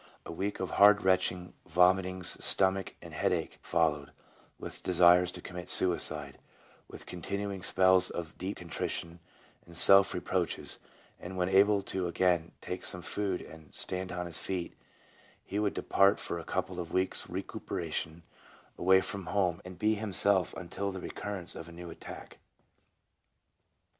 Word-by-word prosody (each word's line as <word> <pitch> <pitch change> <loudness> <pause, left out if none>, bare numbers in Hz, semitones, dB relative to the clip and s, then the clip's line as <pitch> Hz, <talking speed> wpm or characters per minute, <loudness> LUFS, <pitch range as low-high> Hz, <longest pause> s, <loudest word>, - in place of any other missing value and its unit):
A - - -7
week 100 +5 -4
of 95 - -4
hard 105 +1 +5
retching, 90 -1 0
vomitings, 95 0 +2
stomach 95 0 +4
and - - -11
head - - 0
ache - - -3
followed, 75 -4 0 0.5
with - - -6
desires 90 0 +4
to 90 - -7
commit 90 0 -8
suicide, 75 -6 +3 0.5
with - - -11
continuing 100 +2 -5
spells 95 0 +4
of 80 -2 -7
deep 95 +3 -5
contrition 85 0 -4 0.4
and 85 -1 -10
self 100 0 +8
reproaches, 90 -1 -3 0.4
and 95 +1 -8
when 90 0 0
able 100 +1 +4
to 95 -2 -3
again 85 -2 0
take 90 - -6
some 90 -1 -5
food 100 -1 -2
and 80 -2 -14
stand 95 0 -1
on 90 0 -4
his 85 -2 0
feet, 90 -3 -4 0.7
he 100 - -4
would 105 -1 -1
depart 100 +1 +2
for 85 - -4
a - - -8
couple 95 -1 -3
of 85 -2 -6
weeks' 95 0 -1
recuperation 80 +2 -5 0.6
away 95 +1 +4
from 95 -1 -5
home, 90 -4 0
and 90 0 -10
be 110 +3 +1
himself 100 -3 +1
until 95 +2 -5
the 95 -1 -7
occurrence 100 -4 -5
of 80 - -9
a - - -12
new 85 0 -9
attack." - - -11
90 Hz, 150 wpm, -30 LUFS, 85-95 Hz, 0.7 s, self